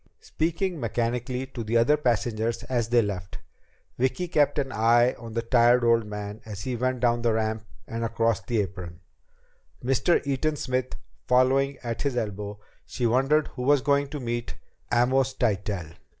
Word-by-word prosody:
Speaking 170 +2 -2
mechanically 120 +2 -2
to 130 -3 -6
the 110 +2 +1
other 120 +6 +4
passengers 115 -4 -1
as 120 -3 -1
they 120 -1 +4
left, 95 -3 -5 0.6
Vicki 130 +8 0
kept 150 -4 +2
an 135 -2 -1
eye 120 +2 +4
on 115 -1 -9
the 115 0 -1
tired 120 0 +4
old 115 -2 +3
man 105 0 -6
as 105 -3 -7
he 130 -1 -2
went 130 +1 -1
down 120 -1 +2
the 115 -1 +2
ramp 110 0 -1 0.2
and 115 0 -4
across 115 -1 +1
the 115 -3 0
apron, 90 -3 -7 0.8
Mr. 135 +7 +3
Eaton 140 +3 0
Smith 130 -2 -2 0.3
following 130 +2 +3
at 115 -1 -3
his 140 -4 -1
elbow. 105 -2 -3 0.3
She 125 - -3
wondered 135 +6 +2
who 125 - -8
was 140 +2 +4
going 140 +1 +2
to 145 +1 -6
meet 120 -2 -4 0.4
Amos 130 +2 +2
Tytell. 100 - -1
120 Hz, 165 wpm, -26 LUFS, 110-130 Hz, 0.8 s, other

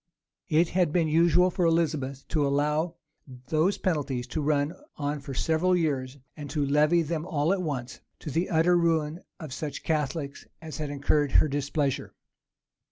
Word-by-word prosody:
It 165 +1 +3
had 180 -4 +1
been 165 -1 +2
usual 170 +3 +4
for 180 - -1
Elizabeth 155 -5 0
to 150 - +1
allow 150 +4 0 0.5
those 160 +5 +2
penalties 145 -8 -1
to 155 - -2
run 145 +1 +1 0.2
on 145 0 -2
for 140 -1 -7
several 165 +6 +2
years; 140 -6 -1 0.2
and 145 -2 -8
to 145 -2 0
levy 150 +4 +3
them 155 0 -3
all 160 0 +1
at 195 - -1
once, 130 -7 -4 0.2
to 150 - -5
the 165 +6 0
utter 170 +2 +3
ruin 165 -2 +1 0.2
of 155 -6 -7
such 145 -1 -5
Catholics 150 -2 -2
as 160 -4 -8
had 150 -2 -3
incurred 145 0 +1
her - - +5
displeasure. 145 -1 -2
155 Hz, 165 wpm, -27 LUFS, 145-165 Hz, 0.5 s, her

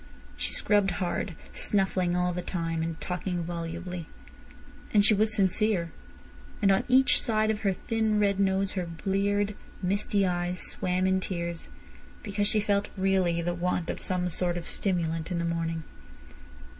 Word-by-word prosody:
She - - -1
scrubbed 205 -2 +3
hard, 180 -1 -2 0.2
snuffling 185 -3 +1
all 180 0 +1
the 180 - -3
time, 165 -2 -2
and 165 0 -3
talking 180 -1 -3
volubly. 170 +1 -5 0.8
And 205 -1 +5
she 215 - +6
was 215 +1 +2
sincere. 190 -3 +1 0.7
And 200 -3 +4
on 195 - +2
each 260 +1 +5
side 215 -1 +2
of 215 - -3
her 195 -2 +2
thin 220 +2 0
red 200 -1 +2
nose 195 0 +2
her 180 -3 -3
bleared, 200 +4 0 0.3
misty 200 +1 +1
eyes 180 0 -1
swam 185 0 0
in 190 0 +3
tears, 170 -2 -4 0.6
because 205 -1 0
she 215 - +4
felt 205 -1 +1
really 185 -3 +2
the 175 +1 0
want 175 0 -1
of - - -7
some 180 -1 +1
sort 175 0 0
of 170 - -5
stimulant 165 -4 -1
in 180 - -1
the 170 - -1
morning. 165 -1 -2
185 Hz, 155 wpm, -28 LUFS, 175-200 Hz, 0.8 s, she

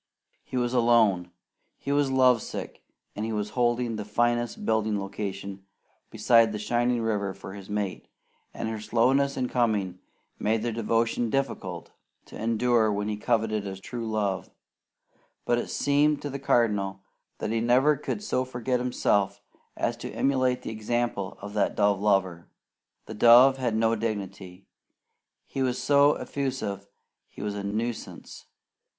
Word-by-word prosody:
He 130 - -5
was 120 0 0
alone, 115 -7 +3 0.5
he 140 - -4
was 145 -1 +2
love 130 -3 +4
sick, - - -7 0.3
and 105 - -3
he 115 - -2
was 105 -1 -2
holding 120 -2 0
the 105 - -4
finest 120 +3 0
building 110 -2 +1
location 100 0 -5 0.5
beside 115 -2 +4
the 105 - -3
shining 120 +2 0
river 100 -3 -1
for 95 - -9
his 100 -1 -10
mate, 105 -3 -3 0.4
and 115 - -5
her 110 -1 -3
slowness 130 +6 +2
in 130 -1 0
coming 105 -7 0 0.4
made 110 +1 0
their 120 - -1
devotion 115 +1 0
difficult 95 -10 -3 0.3
to - - -13
endure 115 0 +2
when 105 +1 -2
he 105 - -1
coveted 110 -2 0
a 95 -1 -5
true 115 +4 -6
love; 100 -3 -1 1.0
but 120 0 +2
it - - -5
seemed 145 +1 +2
to 145 - -4
the 140 - -5
Cardinal 105 -7 +1 0.4
that - - -3
he 115 - +1
never 130 +6 +4
could 175 +8 -4
so 130 -11 0
forget 125 0 -2
himself 105 -5 +1 0.4
as - - 0
to - - -7
emulate 130 -2 +1
the - - -5
example 110 -3 -2
of 100 0 -7
that 105 - 0
dove 100 -2 +2
lover. 95 -5 +1 0.6
The - - -8
dove 125 +4 +7
had 120 -4 -1
no 115 +1 +2
dignity; 100 -4 -5 0.8
he 135 - -4
was 130 -1 0
so 140 +3 +5
effusive 110 -8 -4 0.4
he - - -9
was 105 -1 -2
a 100 -1 -5
nuisance. 110 +3 -5
115 Hz, 155 wpm, -27 LUFS, 105-125 Hz, 1.0 s, dove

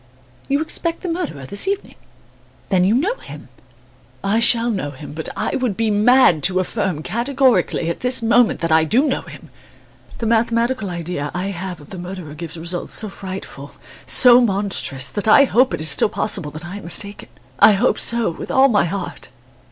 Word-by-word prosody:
"You 280 +2 0
expect 330 +1 -2
the 365 - -3
murderer 330 - -4
this 200 - -2
evening? 395 0 -3 0.8
Then 185 -2 +2
you 200 +5 +3
know 395 - 0
him?" - - -12 0.7
"I 200 +3 +1
shall 235 0 +2
know 185 -9 -3
him; 145 +1 -10
but 160 +1 -4
I - - -2
should 250 -7 -2
be 225 -1 0
mad 210 - +4
to 185 0 +2
affirm, 185 -4 -2
categorically, 235 - +1
at 170 - -3
this 250 -1 0
moment 235 +1 +3
that 165 -1 -1
I 160 0 +5
do 235 - +2
know 270 - -1
him. - - -13 0.7
The 230 - -4
mathematical 230 0 0
idea 170 -4 -4
I 185 +2 -2
have 180 -2 -6
of 145 - -16
the 190 - -7
murderer 180 -4 -8
gives 165 +1 -8
results 170 +2 -3
so 215 - -1
frightful, 190 -7 -9 0.3
so 250 -1 +7
monstrous, 195 - 0
that 205 0 -3
I 280 +6 +7
hope 255 -1 +2
it - - -3
is 155 -2 +2
still 140 - +3
possible 185 -8 -2
that 155 +3 -9
I 180 +4 -7
am 205 - -10
mistaken. 200 +4 -4 0.3
I 215 - +7
hope 215 +6 +1
so, 235 -4 +1
with 165 - -9
all 270 0 +4
my 205 -7 +2
heart!" 185 +1 -6
200 Hz, 190 wpm, -19 LUFS, 170-240 Hz, 0.8 s, so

